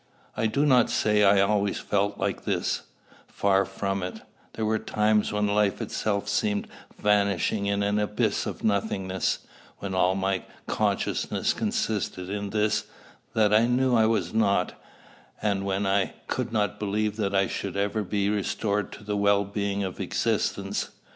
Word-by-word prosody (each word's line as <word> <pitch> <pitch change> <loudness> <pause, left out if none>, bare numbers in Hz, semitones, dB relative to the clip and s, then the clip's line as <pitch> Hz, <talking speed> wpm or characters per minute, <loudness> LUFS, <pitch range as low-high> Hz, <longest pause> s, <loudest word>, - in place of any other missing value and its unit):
I 110 - +1
do 140 +7 +1
not 125 -5 +5
say 105 -1 +2
I 100 0 +6
always 100 0 +1
felt 100 0 0
like - - -2
this, - - -1 0.5
far 100 -1 +2
from 95 0 -3
it: 90 0 -5 0.3
there 110 - -2
were 110 0 +1
times 105 0 +1
when 105 0 +1
life 105 -1 +2
itself 100 -2 -2
seemed 105 0 0 0.3
vanishing 100 0 +1
in 100 0 +1
an 105 +1 +1
abyss 105 0 0
of - - -6
nothingness, 95 -3 0 0.3
when 100 -1 -5
all 95 0 +3
my 95 -1 0 0.2
consciousness - - 0
consisted 95 -3 -2
in 100 0 -3
this, 105 +1 +1 0.5
that 105 -1 +4
I 110 +2 +5
knew 125 +1 +2
I 110 -1 +5
was 115 -1 0
not, 100 -4 +2 0.7
and 100 -2 0
when 100 +1 0
I 95 0 +1
could - - -2
not 105 -4 0
believe 105 +1 -1
that 100 -2 -1
I 95 0 +4
should 100 0 -4
ever 100 +2 0
be 100 0 -1
restored 105 0 -1
to 105 - -11
the 105 0 -2
well 100 0 +3
being 100 0 -2
of 95 -2 -5
existence. - - -1
100 Hz, 160 wpm, -26 LUFS, 100-105 Hz, 0.7 s, I